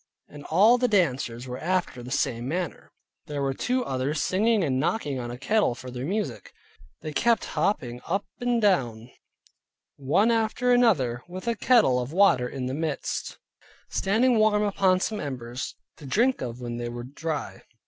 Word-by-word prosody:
And 145 -1 -12
all 215 +9 +5
the 250 - +2
dancers 130 - 0
were 125 0 -5
after 175 -7 -1
the 120 - -9
same 120 -2 -1
manner. 175 +4 -4 0.4
There 145 -2 -3
were 135 -1 0
two 250 - -1
others 135 - -1
singing 215 +4 +2
and 130 -4 0
knocking 145 - -1
on 120 -1 -5
a 120 - -6
kettle 140 - +1
for 130 0 -9
their 125 +1 -5
music. 210 +4 -3 0.5
They 155 -1 -6
kept 235 +7 +2
hopping 150 -8 -1
up 195 +4 -1
and 245 -1 +1
down 125 - +1 0.9
one 150 - +2
after 230 +2 +1
another, 150 - +3
with 185 +4 -8
a 235 - +2
kettle 220 - +4
of 125 +2 -4
water 165 -10 +4
in 135 -2 -5
the 130 - -3
midst, 155 0 -3 0.5
standing 225 +4 +2
warm 215 -1 +3
upon 190 -2 +2
some 215 +1 -2
embers, 125 -4 -5 0.2
to 145 - -11
drink 245 - +2
of 120 -1 -5
when 120 -1 -5
they 120 0 -4
were 120 0 -6
dry. 150 +4 -5
155 Hz, 170 wpm, -26 LUFS, 125-210 Hz, 0.9 s, all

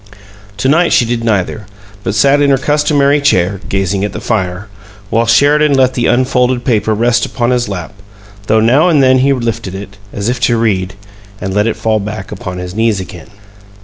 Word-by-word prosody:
To 115 - -1
night 170 +5 +3
she 120 - +3
did 115 0 -2
neither, 105 -2 -1 0.4
but 100 - -2
sat 140 +7 +3
in 145 - +3
her 135 - +3
customary 145 0 +1
chair, 100 -8 +1
gazing 95 0 -1
at 105 - -3
the - - -5
fire, 95 -2 -3 0.4
while 115 0 +1
Sheridan 145 +5 +3
let 130 -1 +2
the 120 -1 0
unfolded 125 -1 +1
paper 110 -3 +1
rest 120 +2 +1
upon 120 -1 -1
his 120 -3 0
lap, 95 0 -6 0.5
though 110 - +3
now 135 +10 +3
and 150 -5 +3
then 130 0 +4
he 135 +2 +2
lifted 115 -6 -3
it, 100 0 -9
as 100 +1 -4
if 125 0 -1
to 120 -1 +1
read, 95 -5 -1 0.4
and 95 0 -4
let 105 +2 +1
it 115 - -1
fall 110 -1 0
back 105 -1 -6
upon 90 0 -6
his 90 0 -6
knees 110 -1 0
again. 90 0 -10
115 Hz, 195 wpm, -13 LUFS, 100-130 Hz, 0.5 s, then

